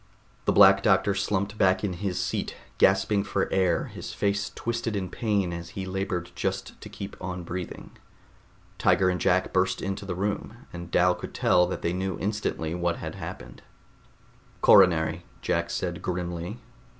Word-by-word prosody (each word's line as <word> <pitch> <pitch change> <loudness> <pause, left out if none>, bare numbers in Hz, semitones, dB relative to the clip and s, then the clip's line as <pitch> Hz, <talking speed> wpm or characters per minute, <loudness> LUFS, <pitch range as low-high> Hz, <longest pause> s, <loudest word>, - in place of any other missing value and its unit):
The - - +3
Black 95 -1 +7
Doctor 100 -1 +3
slumped 100 +1 -1
back 95 +1 +3
in 100 -3 -1
his 90 0 -3
seat, - - -2 0.2
gasping 95 +1 +4
for 100 -1 -1
air, 95 -3 +2
his - - -8
face 100 0 0
twisted 115 -1 -2
in 95 -3 -3
pain 100 -6 0
as 85 0 -6
he 95 - -3
labored 95 -2 -3
just - - -4
to - - -9
keep 100 0 -7
on 90 -1 -4
breathing. 90 +1 -6 0.9
Tiger 95 - +4
and 90 - -3
Jack 95 +1 +2
burst 95 0 +2
into 95 +1 -3
the 90 - -3
room, 105 +5 -3
and 85 0 -7
Dal 90 +1 +4
could - - -8
tell 90 0 +4
that - - -5
they 85 - 0
knew 95 -1 -2
instantly 100 -6 -2
what 85 -1 0
had - - -6
happened. - - -8 1.0
"Coronary," 80 -1 +5 0.2
Jack - - 0
said - - -3
grimly. 90 +2 -3
95 Hz, 160 wpm, -27 LUFS, 90-100 Hz, 1.0 s, Black